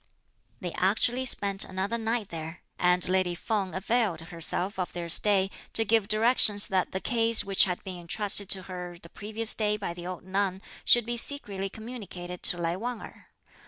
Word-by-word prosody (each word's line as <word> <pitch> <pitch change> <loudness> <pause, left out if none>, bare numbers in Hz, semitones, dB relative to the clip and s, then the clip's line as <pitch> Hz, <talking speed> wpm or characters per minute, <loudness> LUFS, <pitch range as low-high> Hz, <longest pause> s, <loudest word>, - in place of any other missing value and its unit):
They 180 -3 -4
actually 235 +8 +1
spent 200 -4 +3
another 195 +5 -3
night 225 -2 -2
there, 160 0 -8 0.2
and 180 0 +3
lady 185 -1 +1
Feng 195 -1 -2
availed 205 -3 0
herself 175 +3 -2
of 180 - -3
their 175 -1 -5
stay 195 +2 +3 0.2
to 225 - +2
give 220 -1 +2
directions 215 -2 +3
that 190 -1 -1
the 190 - -3
case 230 +1 +2
which 195 -1 +3
had 180 -2 -4
been 185 -2 -7
entrusted 200 +3 +1
to 190 -1 +1
her 180 -1 -8
the 170 - -14
previous 220 +4 +1
day 210 -1 0
by 195 -4 -5
the 175 0 -8
old 180 -1 -7
nun 190 +1 -2 0.2
should 240 -2 +5
be 240 +1 -3
secretly 205 -7 -3
communicated 195 -6 -8
to 175 - +8
Lai 170 0 -1
Wang 240 +2 -4
Erh. - - -13
195 Hz, 180 wpm, -27 LUFS, 180-220 Hz, 0.2 s, to